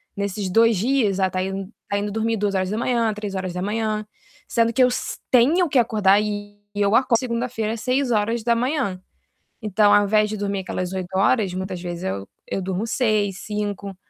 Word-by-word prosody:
nesses 200 -1 -3
2 225 +2 +4
dias 220 -2 +1
a 190 - +3
estar 185 0 -2
indo 195 +2 -5
estar 200 0 -2
indo 205 0 -3
dormir 225 +1 0
02:00, 210 +3 0
03:00, 210 +2 -3 0.4
sendo 230 0 +1
que 255 - +4
eu - - +6
s 250 - -3
tenho 310 +8 +4
que 270 - +1
acordar 210 -4 +3
e 205 -1 -4 0.2
eu 205 +1 +2
acordo 245 -2 +3
segunda-feira 235 -2 -2
06:00. 235 -1 0 0.6
Então 210 0 +3
ao 205 - +6
invés 210 +1 +2
de 215 - -4
dormir 200 -1 -2
aquelas 185 0 -4
8 190 0 -4
horas, 200 -1 +2
muitas 185 -1 -4
vezes 175 -1 -5
eu 95 +1 -3 0.2
eu 195 - -2
durmo 190 +3 -2
6, 215 -5 0
5. 205 -2 -4
210 Hz, 160 wpm, -22 LUFS, 195-230 Hz, 0.6 s, eu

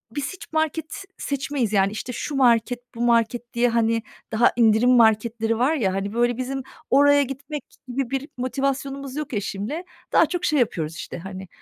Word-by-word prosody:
biz 290 +4 -3
hiç 360 - -12
market 315 0 0
s 395 - -7
seçmeyiz 275 -5 -2
yani, 195 0 +3
işte, 230 +4 -5
şu 290 - -4
market, 245 -2 +3 0.2
bu 235 - -5
market 240 +1 +1
diye, 240 +1 +3
hani, 230 -1 +1 0.3
daha 230 +2 +4
indirim 230 +1 +4
marketleri 225 -1 +3
var 275 +6 +3
ya, 195 -10 0
hani, 195 +1 -3
böyle, 240 +1 +1
bizim 265 +1 -3 0.3
oraya 285 +1 +5
gitmek 275 +3 -6 0.2
gibi 250 0 -2
bir 275 +2 -3
motivasyonumuz 275 +1 -2
yok 300 -3 -4
eşimle. 210 - -3 0.3
Daha - - +6
çok 355 0 -3
şey 300 -3 +2
yapıyoruz, 165 -9 -1
işte, - - -7
hani, 190 +1 -8
245 Hz, 175 wpm, -23 LUFS, 225-275 Hz, 0.3 s, Daha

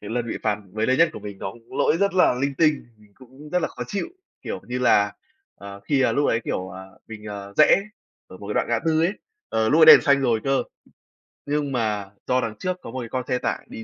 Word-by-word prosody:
cái 105 - -9
lần 120 0 -2
bị - - -4
phạt 105 -2 0 0.2
gần 110 +1 0
đây 130 0 +2
nhất 165 0 +5
của - - -8
mình 100 -2 -8
nó 95 - -5
cũng 115 0 -13
lỗi 160 - +3
rất 200 +1 0
là 180 -8 +4
linh 140 +2 -2
tinh. 155 -4 +1
Mình 105 -1 -23
cũng 135 +4 -15
rất 180 - +3
là - - 0
khó - - -7
chịu, 205 - -3 0.3
kiểu - - -5
như 125 +1 -3
là, 105 -5 +3 0.4
ờ, 100 0 -11
khi, 135 +6 +1
à, - - +2
lúc 145 - +1
ấy, 115 - +1
kiểu, 95 0 -3
à, 95 - -9 0.2
mình, 110 -1 -10
à, 100 -1 -8
rẽ 175 +5 +5 0.4
ở - - -12
một - - -11
cái - - -3
đoạn - - 0
ngã - - +1
tư 160 -1 +2
ấy, 180 +4 +2 0.4
ờ, 110 0 0
lúc 160 +3 +3
đấy - - +12
đèn - - -3
xanh 140 -1 +3
rồi 115 -4 +1
cơ, 135 0 +1 0.8
nhưng 145 -1 -1
mà 105 -5 -2 0.2
do 125 0 +2
đằng 110 -1 -4
trước 185 0 -2
có 115 - -9
một 130 - -5
cái 115 -2 -6
con 130 -1 -3
xe 125 - 0
tải - - -3
đi 110 - -8
125 Hz, 265 wpm, -23 LUFS, 110-145 Hz, 0.8 s, đấy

